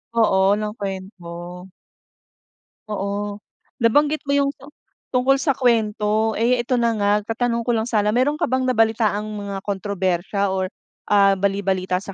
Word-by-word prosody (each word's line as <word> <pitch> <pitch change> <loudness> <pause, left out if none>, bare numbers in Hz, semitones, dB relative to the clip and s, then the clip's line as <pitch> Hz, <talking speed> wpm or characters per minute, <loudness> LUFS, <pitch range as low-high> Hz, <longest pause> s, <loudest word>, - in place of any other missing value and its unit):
Oo, 200 -2 +3
ng 210 0 -3
kwento. 180 -2 -7 1.2
Oo. 205 0 -3 0.4
Nabanggit 290 +6 +2
mo 280 - 0
'yung 280 0 +3
tu 275 - -14 0.5
tungkol 260 +2 +3
sa 280 -2 +2
kwento. 220 -2 +1
Eh, 240 +3 +2
ito 245 +2 -3
na 235 -1 +2
nga, 205 0 +2
tatanong 235 +1 -1
ko 240 - +1
lang 220 0 0
sana. 210 -2 +2
Meron 280 +5 +2
ka - - +1
bang 260 0 +1
nabalitaang 220 -3 +1
mga 200 -2 -5
kontrobersiya 195 -1 -1
or, 190 -1 -1 0.4
ah, 200 -1 +5
bali-balita 190 -2 0
sa 195 -1 -8
210 Hz, 145 wpm, -21 LUFS, 195-235 Hz, 1.2 s, ah